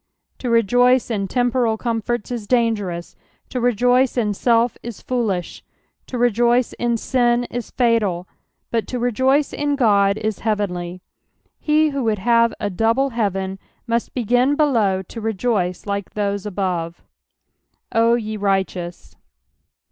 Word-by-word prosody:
To 250 - -3
rejoice 245 +2 +3
in 200 -3 -1
temporal 245 -1 +1
comforts 235 0 -2
is 230 -4 -4
dangerous, 205 -8 0 0.3
to 255 - -3
rejui^in 245 -1 +2
self 235 +3 +2
is 235 -3 -7
foolisli, 215 -9 -2 0.5
to 250 - -5
rejoice 240 +1 +2
in 240 -1 +1
sin 240 0 +1
is 240 -2 -4
falsi, 215 -8 +1 0.5
but 230 -2 -1
to 250 - -3
rejoice 260 +4 +1
in 290 -1 0
God 200 -6 +3
is 215 -1 -3
heavenly. 185 -4 -2 0.6
^He 305 0 +3
who 275 -2 -2
would 220 -1 +1
have 230 +3 +3
a 205 -1 -2
double 230 +8 +1
heaven 195 -4 -2 0.3
must 235 -1 -2
begin 245 +3 +2
below 225 -11 +2
to 225 +5 -9
rejoice 210 -4 -1
like 200 -1 -4
those 200 -1 -1
abovu 180 -4 -2 1.0
"0 230 +1 +4
ye 215 -2 -3
righteous." 190 -3 -2
230 Hz, 130 wpm, -21 LUFS, 200-245 Hz, 1.0 s, 0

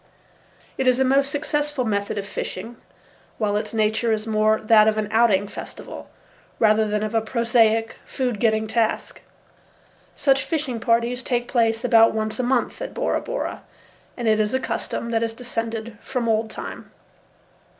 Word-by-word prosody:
It 265 - +1
is 250 -1 +4
a 265 - +3
most 275 +1 +3
successful 295 -2 -1
method 200 -1 -1
of 200 - -3
fishing, 225 +3 -6 0.6
while 210 -2 0
its 210 - -2
nature 220 +1 +1
is 215 0 -1
more 215 0 +2
that 215 -1 +5
of 215 0 +2
an 215 -1 -1
outing 220 -3 +3
festival, - - -9 0.5
rather 215 0 +3
than 210 0 -1
of 215 +1 -3
a 225 - +2
prosaic, 225 -1 +2
food 250 -5 -3
getting 220 -1 +2
task. 220 0 -1 0.9
Such 270 -2 +2
fishing 290 -8 -2
parties 235 +2 +1
take 245 -1 -1
place 225 -2 +1
about 225 -2 +5
once 215 +1 -2
a - - +3
month 245 0 0
at - - -6
Bora - - 0
Bora, - - -4 0.6
and 240 -2 -2
it 215 0 +3
is 215 +3 +1
a - - +2
custom 235 -2 -4
that 225 -1 +1
has 225 -1 -2
descended 230 -2 -5
from 250 -3 -3
old 220 0 +1
time. - - -8
225 Hz, 165 wpm, -23 LUFS, 215-245 Hz, 0.9 s, that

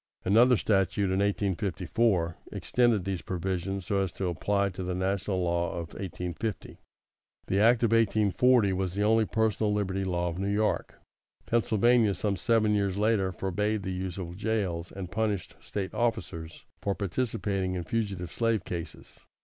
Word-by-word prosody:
Another 120 +6 +5
statute, 100 -1 +1
in 95 - +1
1854, 100 -2 0 0.2
extended 120 -6 +1
these 95 -3 -2
provisions 95 +1 -3
so 100 +1 0
as 95 -2 0
to 95 -2 -2
apply 100 +3 0
to 90 0 -7
the 90 0 -2
national 95 0 -1
law 85 0 0
of 85 -1 -6
1850. 95 +3 -5 0.7
The 95 - 0
act 115 +3 +5
of 115 - +3
1840 110 0 +3
was 95 -1 -2
the 100 - +1
only 110 +1 +4
Personal 110 -1 +1
Liberty 95 -2 -1
Law 90 -2 -1
of 85 +2 -5
New 100 +1 -1
York. 105 +1 0 0.5
Pennsylvania, 115 -1 +3
some 100 +3 -1
seven 110 -1 +2
years 100 -2 0
later, 105 -3 +2
forbade 100 +3 -1
the 95 - -3
use 90 -1 -4
of 90 -2 -6
jails, 95 -6 -2
and 95 -2 -7
punished 105 -4 -1
State 95 -2 -5
officers 85 -9 -3 0.2
for 100 -1 -1
participating 100 -2 -1
in 90 - -3
fugitive 95 -2 -3
slave 115 -5 0
cases. 85 -2 -7
100 Hz, 155 wpm, -28 LUFS, 90-110 Hz, 0.7 s, Another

